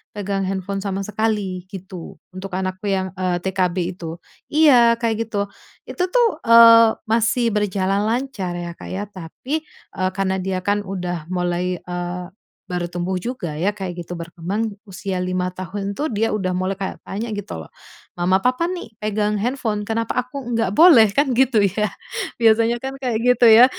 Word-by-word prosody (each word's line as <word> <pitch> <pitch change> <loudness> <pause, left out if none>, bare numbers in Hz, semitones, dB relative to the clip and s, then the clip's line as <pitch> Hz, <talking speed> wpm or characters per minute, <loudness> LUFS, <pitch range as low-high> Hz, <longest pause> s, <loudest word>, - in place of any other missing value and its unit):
pegang 195 -1 -2
handphone 195 +1 -3
sama 195 0 -3
sekali 205 -3 -2
gitu, 185 -3 -8 0.2
untuk 190 +1 -6
anakku 185 +1 -3
yang, 190 -1 -1
eee, 180 -1 -1
TK 190 0 -3 0.2
B 180 -1 -1
itu 165 -1 -7 0.3
iya, 255 -7 +6
kayak 230 -1 -1
gitu. 205 -2 -2 0.4
Itu 360 - -1
tuh, 470 -9 +3
eee, 230 -1 +8
masih 230 +1 +2
berjalan 200 -1 +1
lancar 225 -7 -2
ya, 175 0 -4
Kak, - - -10
ya. 195 +2 -3
Tapi, 205 - -5 0.3
eee, 185 0 0
karena 190 -1 0
dia 185 0 -2
kan 205 +1 +1
udah 180 -4 -4
mulai, 180 0 -1
eee, 175 0 -4 0.4
baru 180 -2 -2
tumbuh 175 +2 -2
juga 180 -6 -4
ya, 200 +4 0
kayak 180 -4 -5
gitu, 175 - -5
berkembang 180 +6 -3
usia 190 0 -4
5 180 0 -1
tahun 195 +2 -5
tuh, 305 - +1
dia 225 +1 0
udah 185 -4 -1
mulai 185 +1 0
kayak 195 - -5
tanya 215 +4 -4
gitu 195 - -6
loh, 80 - -9 0.5
"Mama, 180 +2 +3
Papa 255 +8 +1
nih 355 -7 -5 0.2
pegang 210 0 0
handphone, 220 -2 -1
kenapa 225 +1 -2
aku 255 +3 -7 0.2
nggak 225 -5 +1
boleh?" 245 - +7
Kan 275 +1 +1
gitu 260 -4 +4
ya. 205 +1 +1 0.5
Biasanya 230 +1 +4
kan 265 +2 -5
kayak 250 -5 -1
gitu 250 0 +4
ya. 230 +3 +10
200 Hz, 170 wpm, -21 LUFS, 185-230 Hz, 0.5 s, ya